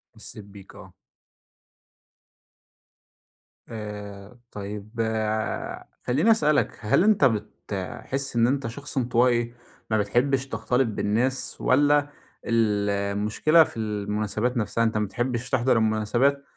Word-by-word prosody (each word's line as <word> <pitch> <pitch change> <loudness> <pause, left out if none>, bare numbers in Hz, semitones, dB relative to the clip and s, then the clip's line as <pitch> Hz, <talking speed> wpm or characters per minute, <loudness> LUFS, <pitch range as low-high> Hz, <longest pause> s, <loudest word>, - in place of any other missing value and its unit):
حسّيت 105 - -9
بيك 100 -1 -14
آه. - - -13 2.8
آآ 105 0 -8
طيّب 105 +1 -7
آآ 110 -1 -2 0.2
خلّيني 150 - +3
أسألك 150 -7 +2
هل 110 - +2
أنت 210 -9 +4
بتحس 110 +3 -3
إن 115 0 +4
أنت 135 -2 0
شخص 140 +5 -6
انطوائي، 120 -1 +2 0.4
ما 110 - +3
بتحبش 130 +5 +1
تختلط 125 +2 0
بالناس 115 +5 -1
والّا 145 +2 +3 0.4
المشكلة 105 +6 +2
في 135 - -9
المناسبات 105 +3 -2
نفسها. 115 +1 0
أنت 110 -1 +1
ما 105 - +1
بتحبش 120 +3 -3
تحضر 130 -2 +2
المناسبات، 115 +6 +1
115 Hz, 105 wpm, -25 LUFS, 105-130 Hz, 2.8 s, أنت